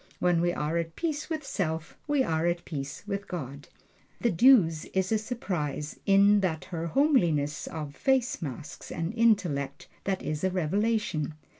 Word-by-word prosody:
When 175 -2 +2
we 175 0 +2
are 155 0 -1
at 165 -1 -4
peace 310 -2 -2
with 310 -3 -3
self 160 - -3
we 290 -2 +3
are 160 -5 0
at 175 0 -1
peace 140 -3 -5
with 200 -1 -4
God. 140 -4 -6 0.5
The 235 - +2
Duse 170 -6 +5
is 190 +1 +1
a 220 - +3
surprise, 175 - -3
in 200 +1 +6
that 170 -5 -1
her 165 0 -2
homeliness 170 - +2
of 150 -3 -6
face 260 -5 +1
masks 145 -1 -7
an 165 +2 -3
intellect 185 - +1 0.2
that 195 -1 -1
is 150 +1 -3
a 190 - +3
revelation. 185 -3 0
175 Hz, 160 wpm, -28 LUFS, 155-215 Hz, 0.5 s, in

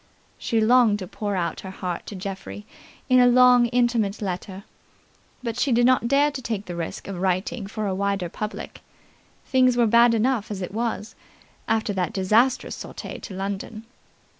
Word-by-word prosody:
She 230 - 0
longed 225 -1 +4
to 190 -3 -7
pour 205 +2 -4
out 170 -3 -2
her 190 - -8
heart 180 -2 -5
to 205 - -7
Geoffrey 195 +2 -7 0.4
in 255 -1 +5
a 245 - +6
long, 250 0 +6
intimate 235 -4 +1
letter, 190 0 -5 0.8
but 235 0 -3
she 275 - +1
did 240 0 +4
not 255 -2 +3
dare 285 +3 +3
to 275 -2 -6
take 220 -4 -4
the 175 - -6
risk 170 -1 -5
of 195 -3 -5
writing 195 +4 -1
for 215 +1 -4
a 195 - -1
wider 200 -1 -1
public. 210 +5 -7 0.6
Things 255 -2 +3
were 240 - +4
bad 235 +1 +5
enough 230 -1 0
as 205 -3 -4
it 180 - -6
was, 225 -1 -3 0.5
after 220 -1 0
that 180 -4 -2
disastrous 225 +7 +2
sortie - - -8
to 195 - -9
London. 200 +3 -5
215 Hz, 175 wpm, -24 LUFS, 195-240 Hz, 0.8 s, a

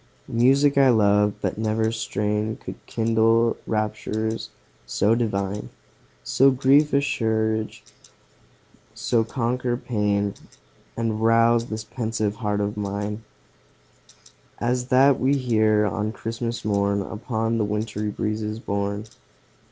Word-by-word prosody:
Music 135 +4 +4
I 135 -1 +6
love 105 -2 +3
but 95 +1 -2
never 110 0 0
strain 105 -1 -2
Could - - -10
kindle 115 +1 +2
raptures 110 0 -2 0.4
so 105 - +2
divine, 105 -3 -2 0.5
So 135 - +4
grief 140 +3 +3
assuage, 110 -5 0 1.1
so 115 -2 +1
conquer 120 +1 -1
pain, 105 -4 -1 0.6
And 110 -2 -1
rouse 115 +1 +4
this 110 -1 -5
pensive 110 -3 -3
heart 105 -2 -1
of 105 +1 -2
mine 105 +1 -3 1.3
As 125 +1 -1
that 135 +1 +4
we 135 +2 +2
hear 110 -4 +2
on 105 +1 -2
Christmas 115 +1 -4
morn, 100 -1 +1
Upon 115 +1 -2
the - - +2
wintry 105 0 -2
breezes 105 +1 -3
borne. 100 0 -3
110 Hz, 110 wpm, -24 LUFS, 105-115 Hz, 1.3 s, I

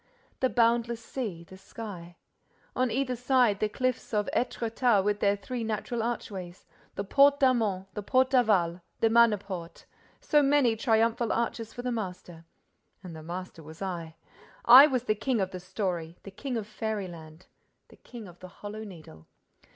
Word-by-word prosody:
The 260 - +2
boundless 235 -1 +1
sea—the 190 -7 -6
sky.—On 190 +5 -7
either 255 +2 -1
side, 245 -4 +2
the 215 - 0
cliffs 255 -1 -2
of 210 0 +1
Étretat 235 -3 +1
with 205 +1 0
their 200 -1 +2
three 230 +4 -5
natural 225 +2 -3
archways: 195 -6 -5 0.3
the 200 - -3
Porte 280 +7 +4
d'Armont, 225 -8 +2
the 210 - -4
Porte 255 +5 +2
d'Aval, 190 -9 +2 0.2
the 225 - +3
Manneporte—so 210 - 0
many 275 -5 +3
triumphal 225 0 +1
arches 230 -1 -2
for 245 - -8
the 250 - -2
master. 180 -6 -6 0.6
And 175 -3 -9
the 160 - -9
master 175 +1 -7
was 160 +1 -12
I! 170 -4 -5 0.5
I 260 +5 +10
was 255 -4 -1
the 215 - +1
king 240 +2 -1
of 190 -1 -1
the 185 - -6
story, 180 -3 -4
the 195 - -9
king 245 +5 -4
of 220 - -4
fairyland, 185 -7 -6 0.4
the - - -18
king 235 -4 -11
of 175 -1 -15
the 185 - -10 0.2
Hollow 210 +1 -6
Needle! 155 - -12
215 Hz, 155 wpm, -28 LUFS, 185-240 Hz, 0.6 s, I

